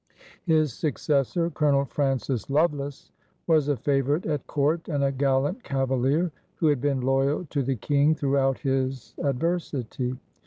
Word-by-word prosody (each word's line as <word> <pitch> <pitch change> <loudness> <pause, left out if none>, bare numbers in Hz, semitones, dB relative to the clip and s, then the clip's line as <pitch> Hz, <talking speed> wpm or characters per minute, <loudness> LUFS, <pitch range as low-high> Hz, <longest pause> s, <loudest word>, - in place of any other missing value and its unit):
His 155 -5 +3
successor, 150 +3 0
Colonel 145 -2 +2
Francis 135 -3 -1
Lovelace, 145 -2 0 0.3
was 155 -4 +3
a 145 - +1
favorite 140 +4 0
at 150 -3 -2
court 155 +3 0
and 145 -3 0
a 135 - +2
gallant 140 - 0
cavalier 135 +5 0 0.2
who - - -1
had 145 -4 +1
been 140 -2 0
loyal 135 +6 +1
to 145 - 0
the 135 0 -1
King 145 +6 +2
throughout 135 -2 +1
his 130 -2 -2
adversity. 135 -4 -2
140 Hz, 140 wpm, -26 LUFS, 135-150 Hz, 0.3 s, His